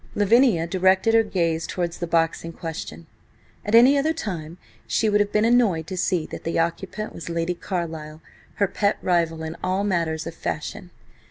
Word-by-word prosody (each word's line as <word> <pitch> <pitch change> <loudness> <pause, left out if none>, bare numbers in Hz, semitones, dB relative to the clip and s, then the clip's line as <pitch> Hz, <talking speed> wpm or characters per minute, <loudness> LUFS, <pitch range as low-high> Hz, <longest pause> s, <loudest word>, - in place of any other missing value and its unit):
Lavinia 210 -4 +4
directed 190 +4 +2
her 225 - +6
gaze 170 -6 -1
towards 175 -2 -3
the 175 - -3
box 165 0 +1
in 165 0 -7
question. 150 - -7 0.6
At 210 +2 +1
any 260 +5 +7
other 315 +3 +1
time 175 - -5 0.3
she 220 - +1
would 210 0 +3
have 205 0 +1
been 215 +1 +2
annoyed 225 -9 +3
to 185 - -6
see 180 -2 0
that - - -7
the 165 - -2
occupant 185 +5 -2
was 170 - -8
Lady 170 +1 -1
Carlyle, 160 -4 -5 0.4
her 200 - +2
pet 200 +2 0
rival 165 -3 +1
in 160 +1 -5
all 185 +2 0
matters 165 -5 -1
of - - -6
fashion. - - -5
180 Hz, 180 wpm, -23 LUFS, 165-205 Hz, 0.6 s, any